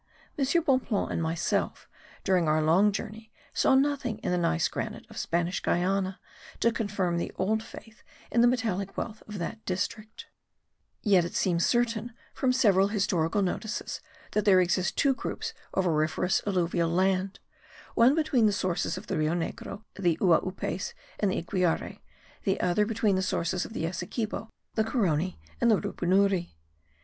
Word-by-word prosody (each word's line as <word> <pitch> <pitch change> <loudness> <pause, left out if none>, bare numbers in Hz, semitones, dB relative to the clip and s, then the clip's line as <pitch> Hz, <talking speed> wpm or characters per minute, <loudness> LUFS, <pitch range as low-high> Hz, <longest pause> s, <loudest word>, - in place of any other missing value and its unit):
M. 280 - 0 0.2
Bonpland 255 - +1
and - - -1
myself, 165 +1 -1 0.4
during 185 -4 +2
our 155 +1 +3
long 170 +7 +4
journey, 220 +2 -6 0.2
saw 265 - +4
nothing 270 -4 +1
in - - 0
the 180 - +2
gneiss 80 - +2
granite - - -5
of - - -11
Spanish 175 +2 0
Guiana 190 +1 0 0.4
to 235 - +3
confirm 200 -6 -1
the 170 - -2
old 215 +3 0
faith 225 0 -12 0.3
in 235 - +4
the 240 - +6
metallic 215 -6 -1
wealth 215 -2 -4
of 210 -1 -6
that 215 +6 -5
district; 210 +4 -4 0.8
yet 195 -5 +5
it 170 - -5
seems 170 -2 +2
certain 240 -1 0 0.2
from 260 - +1
several 200 -6 +4
historical 195 -3 +1
notices 215 +4 -3 0.3
that 210 - +1
there 195 -3 +6
exist 180 +1 +1
two 280 -1 +4
groups 265 - -4 0.2
of 190 - 0
auriferous 160 +3 +1
alluvial 175 -3 +1
land; 190 +2 +1 0.5
one 245 +5 +5
between 290 -8 +3
the - - +3
sources 185 -3 -1
of - - -8
the - - -2
Rio 155 +2 +1
Negro, 195 +4 -5
the 175 -5 +1
Uaupes 185 - +1 0.3
and 205 - +2
the - - -1
Iquiare; 175 0 -1 0.4
the 195 -2 0
other 180 +4 +2
between 215 -3 +1
the - - +1
sources 180 -1 -1
of - - -9
the 165 - -2
Essequibo, 210 +6 -3 0.2
the 220 - +2
Caroni 185 - 0 0.2
and 235 - +4
the 215 - +5
Rupunuri. 185 - +1
195 Hz, 160 wpm, -28 LUFS, 175-220 Hz, 0.8 s, the